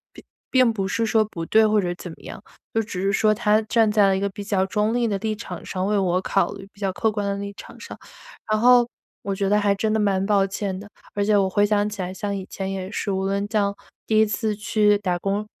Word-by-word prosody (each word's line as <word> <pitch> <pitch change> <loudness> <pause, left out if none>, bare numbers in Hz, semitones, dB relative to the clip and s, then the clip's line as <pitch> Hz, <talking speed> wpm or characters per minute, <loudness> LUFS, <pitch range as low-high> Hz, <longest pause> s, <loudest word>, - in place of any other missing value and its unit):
并 - - -13 0.3
并 255 -3 +4
不 195 -3 -2
是 225 +3 0
说 220 -1 +3
不 165 -6 -6
对， 220 0 +5
或 215 0 +3
者 175 -2 -2
怎 175 0 -9
么 - - -13
样， - - -9 0.3
就 225 - +2
只 200 -4 -6
是 195 - +1
说 215 +1 +3
她 215 -1 +2
站 220 0 +2
在 210 -2 +4
了 195 - +3
一 190 - -2
个 200 - 0
比 200 +1 -8
较 195 -2 +1
中 210 +3 0
立 240 -1 +1
的 205 - 0
立 215 +1 -2
场 185 -6 -8
上， 185 0 -3
为 210 +1 +1
我 185 -1 +1
考 195 - 0
虑， 195 0 -10
比 - - -23
较 195 -2 -1
客 220 +3 0
观 205 -1 -3
的 200 - 0
立 200 0 -5
场 - - -12
上。 - - -9 0.5
然 215 - +3
后 245 0 +6 0.4
我 200 -1 -2
觉 195 0 -1
得 210 - +3
还 200 -1 +2
真 215 +2 -1
的 220 - +1
蛮 195 -2 +1
抱 200 -2 +3
歉 195 -1 -4
的， 205 - -10 0.3
而 205 0 0
且 210 0 +2
我 195 -1 +3
回 205 +2 +2
想 205 0 +2
起 205 -2 -5
来 180 +1 -4
像 200 +1 -3
以 190 - -5
前 195 0 -4
也 190 0 -4
是， 210 - -3
无 190 0 -1
论 200 +1 -1
像 200 -2 +1 0.3
第 215 -1 +2
1 220 - +5
次 215 0 -1
去 210 -1 +2
打 180 -3 -1
工 200 +3 -2
205 Hz, 285 characters per minute, -23 LUFS, 195-215 Hz, 0.5 s, 后